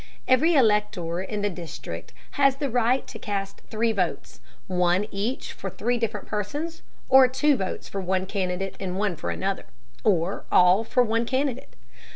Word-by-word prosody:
Every 310 +7 +4
elector 210 - +2
in 205 +2 -4
the 205 - +2
district 175 -2 -7 0.2
has 275 -2 +3
the 275 -2 -3
right 245 +2 +2
to 225 - -9
cast 200 -2 -4
three 225 +1 +1
votes, 185 -5 -2 0.3
one 180 +1 +2
each 215 +7 -3
for - - -5
three 245 +1 -1
different 220 -3 -2
persons, 290 - -4 0.3
or 265 -1 +8
two 285 +3 +2
votes 190 -6 -4
for 195 - -4
one 185 0 0
candidate 190 -1 -2
and 185 -1 -3
one 200 -3 0
for 165 - -4
another, 195 +1 -2 0.4
or 185 -3 +1
all 180 +4 +6
for 250 +2 +2
one 230 0 0
candidate. 265 -1 -2
210 Hz, 165 wpm, -25 LUFS, 190-250 Hz, 0.4 s, or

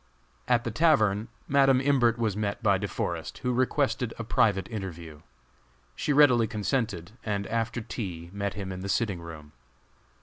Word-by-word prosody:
At 120 -1 +3
the 120 - -3
tavern 110 -8 +3 0.2
Madam 135 -2 +4
Imbert 130 -4 +3
was 110 -4 0
met 105 +1 -3
by 100 -3 +3
De 100 - -2
Forest, - - -4
who 125 - +1
requested 130 -1 0
a 115 - -4
private 105 -5 +2
interview. 85 -8 -7 0.7
She - - -1
readily 130 -6 +5
consented, 105 -5 -2
and, 100 -2 -2
after 115 +2 -2
tea, 90 -7 -6
met 100 -2 -3
him 95 -1 -5
in 90 - -6
the 95 +1 -5
sitting 100 -5 0
room. 80 -3 -10
110 Hz, 160 wpm, -27 LUFS, 95-125 Hz, 0.7 s, readily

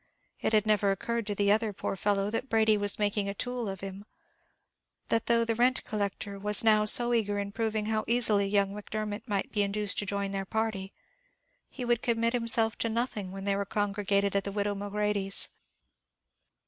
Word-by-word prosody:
It - - -1
had 215 -1 +3
never 210 -2 +2
occurred 230 +3 -2
to 205 - -2
the 200 0 +2
other, 215 0 +1
poor 195 - -4
fellow, 200 +1 0
that 240 +4 -2
Brady 220 -1 +3
was 205 -1 0
making 205 -1 0
a 200 - -5
tool 245 -1 -3
of 195 -1 -7
him; 195 +1 -7 1.1
that 225 0 +1
though 235 -1 +3
the 230 - 0
rent 245 +3 +2
collector 200 -1 -4
was 210 +2 +3
now 215 -1 +4
so 240 +3 +5
eager 205 -3 0
in 200 0 -3
proving 220 -1 -2
how 215 0 -1
easily 220 -4 +2
young 200 -1 +1
Macdermot 210 +1 -5
might 200 -3 -2
be 210 - 0
induced 200 0 -1
to 205 - -3
join 200 -1 -2
their 195 -1 -3
party, 205 -1 -3 0.8
he 250 - -6
would 240 -1 +1
commit 230 0 +1
himself 230 -2 +4
to 230 - -1
nothing 220 -4 -3
when 195 0 -7
they 200 -1 +1
were 200 - -1
congregated 200 -1 -1
at 200 - +1
the 200 - -4
widow 205 0 -1
Mulready's. 205 -1 +1
210 Hz, 190 wpm, -29 LUFS, 200-225 Hz, 1.1 s, so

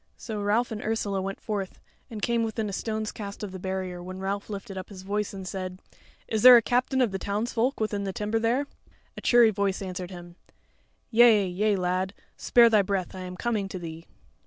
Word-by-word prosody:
So 215 -3 -5
Ralph 215 +4 +1
and 215 -1 -4
Ursula 205 -3 -1
went 195 +1 -4
forth, 200 -3 -4 0.3
and 215 -3 -7
came 235 -1 +2
within 220 -1 -2
a 200 - -5
stone's 215 +1 -3
cast 200 -1 -7
of 205 - -5
the 185 - -7
barrier, 185 -1 -4
when 185 +1 -7
Ralph 195 +2 -3
lifted 200 0 -6
up 185 -1 -6
his 190 -3 -10
voice 205 +2 -2
and 190 -2 -7
said: 185 -1 -5 0.5
"Is 220 -1 -1
there 250 +1 +11
a - - +5
captain 255 +3 +1
of 240 -5 +2
the 195 - -3
townsfolk 230 +6 -1
within 210 -2 -1
the 195 - -2
timber 210 +3 -1
there?" 240 +5 +1 0.5
A - - -8
cheery 240 -2 +5
voice 200 -2 -1
answered 185 -2 -5
him: 175 -1 -11 0.7
"Yea, 225 -3 +6
yea, 200 +3 +1
lad; 185 +2 -1 0.2
spare 240 -1 +5
thy 220 -3 +5
breath; 195 -2 -2
I 185 - -8
am 180 0 -7
coming 215 -4 -1
to 190 - -5
thee." 165 -1 -8
200 Hz, 205 wpm, -27 LUFS, 190-220 Hz, 0.7 s, there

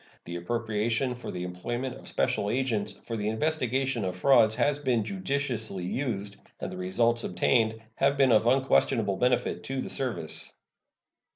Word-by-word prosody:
The 85 - -6
appropriation 115 +6 -1
for 125 - -8
the 90 -1 -4
employment 120 +9 -4
of - - -12
special 100 - 0
agents 110 -4 0
for 115 - -4
the 105 -1 -2
investigation 130 -1 0
of 90 -1 -2
frauds 110 +1 +5
has 145 +3 +1
been 125 -6 +1
judiciously 110 -2 -2
used, 100 -3 -3 0.2
and - - -4
the - - -7
results 115 +6 +2
obtained 110 +4 +1 0.2
have 140 +1 +2
been 135 -2 +4
of 110 +1 +4
unquestionable 120 -5 +2
benefit 125 0 +1
to 135 0 -3
the - - -4
service. 120 - -2
115 Hz, 155 wpm, -28 LUFS, 100-130 Hz, 0.2 s, frauds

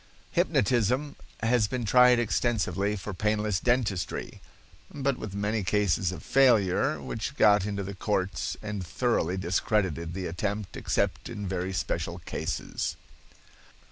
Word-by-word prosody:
Hypnotism 125 +7 +1 0.3
has 115 -1 +3
been 120 +2 -3
tried 125 +2 +6
extensively 105 -3 0
for 100 +1 -6
painless 105 0 0
dentistry, 110 -9 -1 0.5
but 140 -2 -1
with 100 -3 -6
many 105 +1 -1
cases 95 -2 +1
of 90 - -8
failure, 115 -9 +3
which 115 +5 -4
got 105 -5 +5
into 100 -1 -2
the 100 +1 -5
courts 95 0 -2
and 105 -3 -4
thoroughly 95 -2 0
discredited 90 -2 0
the 95 -1 -3
attempt 100 +4 -3
except - - -1
in 105 -1 -5
very 90 0 -2
special 95 - -2
cases. - - -3
105 Hz, 125 wpm, -28 LUFS, 95-115 Hz, 0.5 s, tried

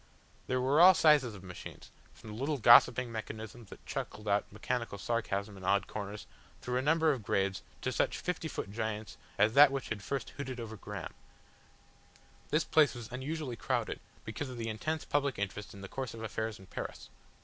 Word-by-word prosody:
There 130 0 +1
were 135 +5 +4
all 185 +1 +10
sizes 145 -8 +5
of 95 - -11
machines, 90 -2 -10 0.2
from 110 - -12
the - - -7
little 140 +5 -1
gossiping 120 0 +7
mechanisms 110 0 -7
that - - -13
chuckled 105 0 -5
out 100 0 +1
mechanical 115 +1 -3
sarcasm 100 -1 -2
in 95 - -11
odd 100 +2 +2
corners, 105 -1 -6 0.3
through 125 0 -2
a - - +1
number 160 +3 +3
of 130 -5 -2
grades 95 -1 0 0.2
to - - 0
such - - +1
fifty 180 -2 -3
foot 100 - -5
giants 110 0 -4 0.2
as 105 +2 +4
that 140 +1 +8
which 135 -1 -3
had 110 -2 -3
first 135 +6 -3
hooted 130 -3 -6
over 110 -1 -6
Graham. 100 - -7 1.4
This 155 +1 +2
place 150 -5 +4
was 120 -1 -8
unusually 135 0 -4
crowded, - - -1 0.3
because 110 +6 -4
of 125 - -7
the 115 -1 -3
intense 155 +9 -2
public 140 -2 0
interest 100 +1 -4
in 100 - -11
the 100 - -6
course 130 +1 -5
of 115 - -7
affairs 110 0 -3
in 95 - -14
Paris. - - -7
115 Hz, 190 wpm, -32 LUFS, 105-135 Hz, 1.4 s, all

